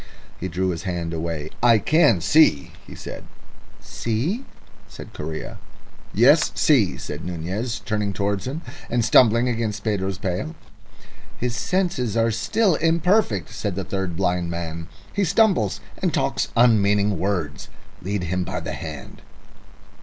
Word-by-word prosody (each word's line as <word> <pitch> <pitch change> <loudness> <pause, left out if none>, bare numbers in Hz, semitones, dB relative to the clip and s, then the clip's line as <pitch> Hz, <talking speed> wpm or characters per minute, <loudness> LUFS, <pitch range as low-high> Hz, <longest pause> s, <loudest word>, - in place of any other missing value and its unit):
He 95 - -3
drew 95 +1 -1
his 85 -2 -3
hand 85 -2 -3
away. 80 -2 -4
"I 120 -1 +6
can 145 - +3
see," 115 - +4 0.2
he - - -10
said. - - -8 0.6
"See?" 145 - -2 0.4
said - - -11
Correa. 80 +1 -6 0.5
"Yes, 140 +9 +5
see," 125 - +3
said - - -6
Nunez, 95 +8 -3
turning 105 -2 -1
towards 100 +1 -2
him, 150 +6 -4 0.3
and 120 -1 +1
stumbled 115 0 +5
against 115 -4 -2
Pedro's 95 -3 -1
pail. 95 - -3 0.8
"His 120 -1 -2
senses 175 - -1
are 115 0 +3
still 185 - +1
imperfect," 165 - +2
said 100 -4 -3
the 95 - -2
third 95 -2 -3
blind 90 -2 0
man. 85 -1 -5 0.3
"He 200 - +1
stumbles, 185 - +2 0.2
and - - +1
talks - - 0
unmeaning 105 -5 +4
words. 90 -7 -2 0.3
Lead 100 0 -2
him 90 +1 -1
by - - -4
the - - -5
hand." 75 -4 -8
105 Hz, 140 wpm, -23 LUFS, 90-125 Hz, 0.8 s, I